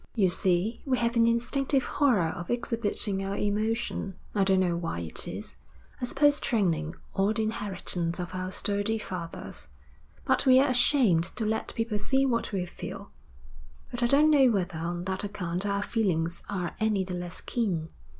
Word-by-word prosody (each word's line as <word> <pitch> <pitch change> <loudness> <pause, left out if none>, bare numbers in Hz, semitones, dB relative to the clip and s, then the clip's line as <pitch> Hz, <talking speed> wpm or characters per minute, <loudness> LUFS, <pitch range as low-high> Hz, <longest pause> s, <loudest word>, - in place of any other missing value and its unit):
'You 195 -6 +3
see, 185 +5 +1
we 260 -2 +1
have 235 0 0
an 230 0 +5
instinctive 260 +3 +1
horror 230 - +2
of 170 +1 -6
exhibiting 225 -4 0
our 195 +1 -3
emotion. 210 -1 -1 0.2
I 200 - +2
don't 190 -1 +3
know 175 -2 +1
why 165 - -3
it 80 -2 -2
is, - - -7 0.4
I - - 0
suppose 290 +3 +3
training 170 - 0 0.2
or 200 +3 +1
the 220 - 0
inheritance 185 -5 -2
of 180 0 -5
our 185 0 -3
sturdy 205 +3 0
fathers, 180 -5 -6 0.6
but - - +2
we're 260 +2 +7
ashamed 245 - +4
to 225 - -2
let 220 +1 -2
people 225 -2 -1
see 265 +6 +2
what 235 -5 0
we 190 -3 -1
feel. 175 - -8 0.8
But 245 - -4
I 240 - +4
don't 295 +4 +5
know 275 -4 +6
whether 180 -6 -1
on 175 +1 -3
that 190 +1 -3
account 185 -1 -3
our 200 0 0
feelings 175 -8 0
are 185 -4 -3
any 215 -3 +1
the 185 0 -6
less 175 -1 -5
keen. 180 -10 -2
205 Hz, 170 wpm, -28 LUFS, 180-235 Hz, 0.8 s, we're